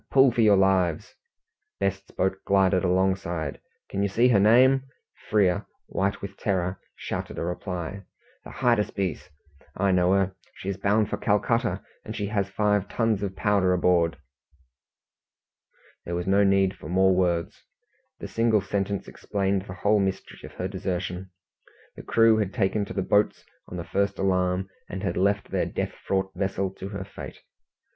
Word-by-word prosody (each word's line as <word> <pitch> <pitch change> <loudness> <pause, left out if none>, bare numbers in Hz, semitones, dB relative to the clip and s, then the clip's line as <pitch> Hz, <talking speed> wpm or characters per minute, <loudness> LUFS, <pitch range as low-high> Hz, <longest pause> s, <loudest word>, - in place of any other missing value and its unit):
Pull 135 -1 +6
for 120 - +1
your 105 -3 +6
lives!" 95 -4 +2 0.7
Best's 100 0 -2
boat 95 +1 -1
glided 95 -1 +3
alongside. 90 -4 0 0.3
"Can 100 - -3
you 100 - +2
see 115 +6 +3
her 110 -5 +5
name?" 130 +6 +5 0.4
Frere, 100 -4 +2 0.2
white 100 +1 -2
with 100 0 -7
terror, 90 -2 -1 0.2
shouted - - -5
a - - -2
reply. 90 +1 -4 0.4
"The - - -10
Hydaspes! 105 - 0 0.5
I 100 +1 +2
know 90 0 +3
her. 95 -1 +1 0.2
She 95 - -6
is 100 - -3
bound 105 +2 +2
for - - -3
Calcutta, 115 +2 0 0.2
and - - -7
she 105 - -2
has 100 -2 -1
five 105 0 +1
tons 115 -4 0
of 95 -2 -3
powder 95 -2 +2
aboard!" 85 -2 +2 1.9
There 85 - -3
was 90 0 -2
no 100 +1 +4
need 95 -1 +3
for 75 - -10
more 95 +1 +4
words. 85 -2 0 0.5
The - - -7
single 115 -2 +2
sentence 100 0 -2
explained 100 -1 -2
the 90 - -7
whole 105 +3 +2
mystery 95 -1 -3
of - - -11
her 90 - -3
desertion. 95 -1 -4 0.7
The - - -9
crew 115 -1 +4
had 105 -1 -1
taken 100 -2 +1
to - - -8
the 95 - -1
boats 105 +2 +1 0.2
on 90 - -7
the 85 - -4
first 100 +2 -1
alarm, 90 -1 +1 0.2
and 95 +2 -5
had 100 - -1
left 100 +2 +1
their - - 0
death - - -3
fraught 95 0 -2
vessel 95 0 -1
to 95 0 -8
her 100 -2 -5
fate. 95 - -10
95 Hz, 165 wpm, -26 LUFS, 95-100 Hz, 1.9 s, Pull